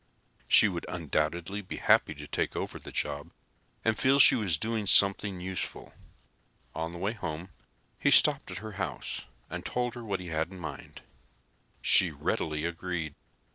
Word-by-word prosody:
She 110 - +7
would 90 -4 -5
undoubtedly 85 +4 -2
be 95 - -7
happy 80 - +3
to 75 +1 -9
take - - -2
over - - -5
the - - -11
job 75 +3 -3 0.6
and 110 -1 +2
feel 135 +4 +3
she 140 - +8
was 95 -8 +1
doing 110 +3 -2
something 100 -1 +4
useful. 95 0 -6 0.8
On 80 +1 -4
the 85 - -9
way 95 +4 -2
home 85 -4 -6 0.5
he - - +2
stopped - - +5
at - - -5
her 110 - -6
house - - -4 0.2
and - - -6
told 125 -1 -2
her 120 - -8
what 100 -4 -3
he 90 -1 -8
had 80 +1 -2
in 95 - -10
mind. 90 - -9 0.8
She - - +7
readily 75 0 -2
agreed. 85 -2 -4
90 Hz, 165 wpm, -29 LUFS, 80-105 Hz, 0.8 s, she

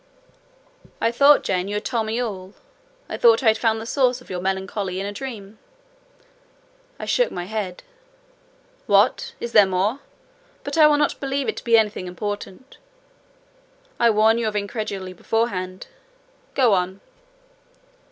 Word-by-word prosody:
"I 230 - +1
thought, 280 +4 +5
Jane, 185 0 -1
you 205 - -3
had 210 - -3
told 230 -3 -1
me 225 +2 -2
all. 195 -5 -5 0.5
I - - -5
thought 230 +1 +5
I 225 - +6
had 220 - +2
found 225 -1 +1
the 220 - -7
source 250 0 +1
of 250 - -14
your 180 -1 -3
melancholy 190 0 -3
in 195 - -3
a 205 - -4
dream." 215 -3 -8 1.4
I - - -6
shook - - +2
my 175 - -5
head. 195 -2 -5 1.0
"What! 470 -1 +2
is 235 - -5
there 210 -3 +6
more? 190 +7 0 0.6
But - - -4
I 310 -2 +7
will 295 -1 +3
not 295 0 0
believe 275 -1 -2
it - - -2
to - - -7
be 230 -1 +4
anything 210 -4 0
important. 205 +6 -7 1.2
I 235 - +5
warn 220 +1 +3
you 230 - -1
of 215 - -3
incredulity 200 -3 -4
beforehand. 185 -2 -2 0.7
Go 250 -6 +4
on." 185 +1 -1
215 Hz, 155 wpm, -22 LUFS, 190-235 Hz, 1.4 s, I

